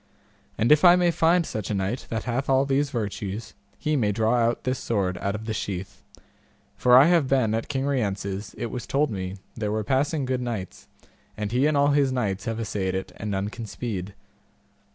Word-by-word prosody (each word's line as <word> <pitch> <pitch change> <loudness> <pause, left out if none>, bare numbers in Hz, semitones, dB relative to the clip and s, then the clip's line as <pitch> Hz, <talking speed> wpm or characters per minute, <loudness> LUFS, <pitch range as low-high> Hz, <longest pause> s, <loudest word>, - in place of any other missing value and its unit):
And 110 +5 +2
if 150 0 +6
I 175 -1 +9
may 175 -1 +3
find 170 +1 +3
such 110 -8 -4
a 105 - 0
knight 100 +6 -2
that 115 -2 -2
hath 125 +3 -2
all 135 0 +4
these 140 +1 +1
virtues, 105 -2 -4 0.2
he 155 -1 -1
may 110 -7 +2
draw 110 +3 +1
out 120 0 +1
this 130 0 -1
sword 100 -7 -1
out 100 +1 -2
of 110 +1 -6
the 110 - -2
sheath, 100 -1 -5 0.7
for 125 0 +6
I 135 - +8
have 170 -4 +3
been 130 -5 +2
at 115 0 -2
King 135 -1 -2
Rience's 100 -6 -2
it 115 - -4
was 120 -2 -5
told 145 -1 +1
me 95 -2 -4 0.2
there 105 -3 -3
were 110 0 -1
passing 135 +5 0
good 130 -1 -1
knights, 110 -7 -5 0.5
and 105 -1 -3
he 130 +4 +3
and 155 -1 +2
all 140 0 +4
his 140 -2 +3
knights 110 -6 -2
have 115 -2 -2
assayed 100 -4 -2
it 95 - -4
and 105 - -5
none 100 0 -1
can 115 0 -7
speed. 100 -4 -5
115 Hz, 210 wpm, -25 LUFS, 100-135 Hz, 0.7 s, I